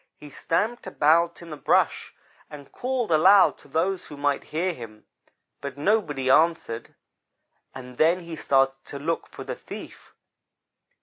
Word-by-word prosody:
He 150 -1 -12
stamped 210 - -2
about 170 0 +2
in 165 - -11
the - - -5
brush - - +1 0.3
and 145 -2 -12
called 250 -5 -2
aloud 185 +5 +5
to - - -17
those 175 +6 -1
who 150 - -10
might 145 0 -1
hear 175 +4 -2
him; 110 -6 -11 0.6
but 140 -1 -6
nobody 150 -6 0
answered, 135 -5 +1 0.8
and 125 -1 -10
then 170 +3 +3
he 170 -1 -7
started 135 -2 +1
to 140 - -7
look 165 +4 -3
for - - -10
the - - -5
thief. - - -11
155 Hz, 145 wpm, -25 LUFS, 140-180 Hz, 0.8 s, aloud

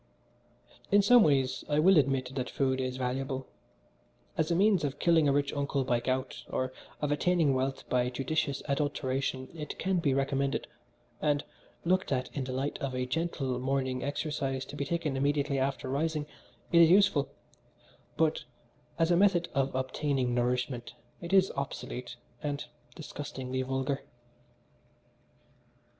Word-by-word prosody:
"In 205 0 +6
some 245 +3 +7
ways 135 -6 +2
I 145 - +2
will 185 +5 +6
admit 135 -2 0
that 130 -2 -3
food 130 -1 0
is 130 0 -3
valuable. 130 +1 -2 0.9
As 160 +1 0
a 170 - +2
means 195 -2 +4
of 140 -2 -2
killing 165 -3 +4
a - - +4
rich 140 0 +1
uncle 140 -1 0
by 125 -2 +1
gout, 130 +2 -2
or 130 0 -2 0.3
of 150 -1 0
attaining 160 -1 +3
wealth 130 +1 -2
by 125 0 +1
judicious 140 +3 -1
adulteration 135 -2 -1
it 155 -3 -6
can 190 -1 +1
be 140 -5 +1
recommended, 135 0 0 0.6
and 145 -1 +1 0.4
looked 185 0 +1
at 130 -1 -1
in 135 -3 -2
the 130 - -4
light 135 +3 -2
of 135 -2 -3
a 125 0 -1
gentle 135 -3 -2
morning 130 -1 -1
exercise 140 -2 -2
to - - -9
be 140 - -2
taken 160 -2 -1
immediately 140 0 +1
after 135 0 -1
rising 150 +3 -1 0.5
it 170 -1 +7
is 165 - +7
useful, 190 -6 +4 0.9
but 160 0 +1 0.5
as 165 +1 +2
a - - +5
method 180 -2 +3
of 135 -1 0
obtaining 130 -1 0
nourishment 125 0 -1 0.3
it 170 +1 -6
is 190 -1 +5
obsolete 125 -2 -5 0.3
and 145 -1 -3 0.3
disgustingly 130 -5 -5
vulgar." 135 +1 -1
140 Hz, 150 wpm, -30 LUFS, 130-155 Hz, 0.9 s, some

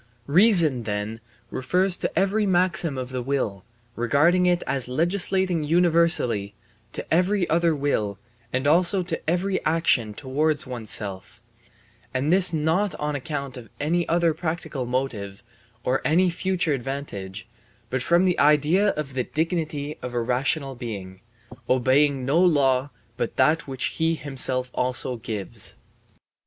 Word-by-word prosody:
Reason 165 - +5
then 105 +1 -4 0.3
refers 180 +8 +1
every 200 +2 +1
maxim 175 -5 +1
of 130 -1 -4
the 130 -1 -4
will, 120 -8 -2 0.3
regarding 150 +10 +3
it 175 0 +1
as 135 -3 -2
legislating 175 +4 +1
universally, 165 - +2 0.4
to - - -4
every 185 +2 +2
other 165 -1 +2
will 110 -9 -1 0.3
and 130 +2 -1
also 175 +5 +3
to 165 -2 -4
every 190 +3 0
action 135 -10 +1
towards 145 +4 -1
oneself; 105 -6 -3 0.8
and 140 +6 +1
this 185 -1 +5
not 165 +5 0
on 150 0 -3
account 140 -1 -5
of 115 -3 -11
any 170 +4 0
other 170 -1 +2
practical 160 -6 -4
motive 120 -5 -3 0.4
or 130 +1 0
any 180 +3 +3
future 180 -3 0
advantage, 120 -8 -5 0.4
but 130 0 -1
from 170 +6 +3
the 180 -2 +1
idea 150 +7 +4
of 145 -3 -5
the 130 -1 -2
dignity 155 -2 -3
of 125 -1 -6
a - - +1
rational 135 +4 -1
being, 100 -7 -7 0.5
obeying 130 +1 +2
no 145 +6 +2
law 140 -6 +3 0.3
but - - -3
that 160 0 +2
which 130 -1 -3
he 165 0 +2
himself 130 -3 0
also 125 0 -1
gives. 105 -3 -3
145 Hz, 135 wpm, -24 LUFS, 125-170 Hz, 0.8 s, Reason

